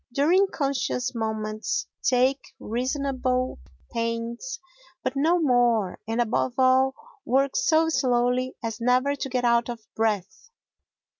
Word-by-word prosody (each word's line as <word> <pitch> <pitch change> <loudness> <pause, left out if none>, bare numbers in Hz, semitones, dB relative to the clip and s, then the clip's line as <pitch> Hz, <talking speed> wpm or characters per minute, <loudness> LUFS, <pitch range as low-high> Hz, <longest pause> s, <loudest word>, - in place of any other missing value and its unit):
During 335 +10 +3
conscious 275 -6 -2
moments 220 +2 -2 0.2
take 255 +2 +1
reasonable 255 +1 -1 0.3
pains 230 - -3 0.4
but - - -1
no 325 +6 +3
more 240 - +2
and, 225 +1 -2
above 240 +1 0
all, 260 +1 +4 0.3
work 270 +2 +1
so 320 0 +3
slowly 255 -2 +1
as 225 0 -4
never 255 +4 +2
to 270 - -4
get 250 -1 -1
out 235 0 +3
of 230 -2 -7
breath. 215 - -2
250 Hz, 120 wpm, -25 LUFS, 230-275 Hz, 0.4 s, all